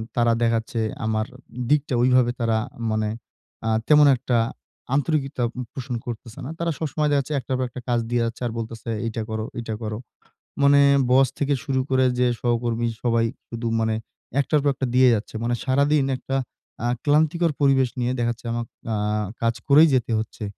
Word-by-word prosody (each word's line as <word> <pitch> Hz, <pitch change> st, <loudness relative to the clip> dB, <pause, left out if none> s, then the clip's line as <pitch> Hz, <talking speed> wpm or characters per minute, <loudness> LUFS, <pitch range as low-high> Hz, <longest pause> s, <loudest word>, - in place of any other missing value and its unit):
তারা 120 Hz, -1 st, +3 dB
দেখা 115 Hz, -1 st, +3 dB
যাচ্ছে 115 Hz, +1 st, -5 dB, 0.3 s
আমার 110 Hz, 0 st, 0 dB, 0.4 s
দিকটা 150 Hz, -3 st, +2 dB
ওইভাবে 125 Hz, -1 st, +4 dB
তারা 115 Hz, -2 st, +1 dB, 0.3 s
মানে 110 Hz, 0 st, 0 dB, 0.6 s
আ -, -, +2 dB, 0.2 s
তেমন 150 Hz, -1 st, +7 dB
একটা 120 Hz, -1 st, 0 dB, 0.6 s
আন্তরিকতা 140 Hz, -3 st, 0 dB, 0.3 s
পোষণ 130 Hz, -1 st, -4 dB
করতেছে 120 Hz, +1 st, -7 dB
না। 140 Hz, -, -5 dB
তারা 170 Hz, 0 st, 0 dB
সবসময় 155 Hz, -1 st, -1 dB
দেখা 145 Hz, -, +4 dB
যাচ্ছে 140 Hz, +3 st, -6 dB
একটার 130 Hz, +1 st, -3 dB
পর 130 Hz, -, 0 dB
একটা 125 Hz, +1 st, -8 dB
কাজ 120 Hz, -1 st, +2 dB
দিয়ে 120 Hz, 0 st, +1 dB
যাচ্ছে, 115 Hz, +2 st, -5 dB
আর -, -, -4 dB
বলতেছে, 115 Hz, 0 st, -6 dB, 0.2 s
"এইটা 115 Hz, 0 st, -3 dB
করো, 110 Hz, 0 st, -3 dB
ঐটা 115 Hz, -2 st, -4 dB
করো।" 105 Hz, -1 st, -3 dB, 0.7 s
মানে 140 Hz, 0 st, +6 dB, 0.3 s
বস 130 Hz, +1 st, +5 dB
থেকে 145 Hz, 0 st, +1 dB
শুরু 135 Hz, -2 st, 0 dB
করে 130 Hz, 0 st, +3 dB
যে 125 Hz, -, +3 dB
সহকর্মী 120 Hz, -1 st, 0 dB, 0.2 s
সবাই 115 Hz, -1 st, +2 dB, 0.2 s
শুধু 115 Hz, 0 st, -5 dB
মানে 110 Hz, 0 st, +1 dB, 0.5 s
১ -, -, +1 dB
টার 150 Hz, -2 st, +4 dB
পর 145 Hz, -, +2 dB
একটা 130 Hz, -, -2 dB
দিয়ে 130 Hz, 0 st, +6 dB
যাচ্ছে। 110 Hz, 0 st, -4 dB
মানে 120 Hz, +1 st, 0 dB
সারাদিন 140 Hz, +2 st, +3 dB
একটা 135 Hz, +1 st, -3 dB, 0.5 s
আ -, -, +1 dB, 0.2 s
ক্লান্তিকর 155 Hz, +3 st, +3 dB
পরিবেশ 135 Hz, -2 st, +4 dB
নিয়ে 125 Hz, +1 st, 0 dB
দেখা 120 Hz, 0 st, +1 dB
যাচ্ছে, 120 Hz, +1 st, -13 dB
আমাকে 120 Hz, -1 st, -4 dB, 0.2 s
আ -, -, 0 dB, 0.5 s
কাজ 115 Hz, 0 st, +2 dB
করেই 150 Hz, +4 st, +7 dB
যেতে 120 Hz, -2 st, +1 dB
হচ্ছে। 110 Hz, 0 st, -5 dB
125 Hz, 180 wpm, -23 LUFS, 115-140 Hz, 0.7 s, তেমন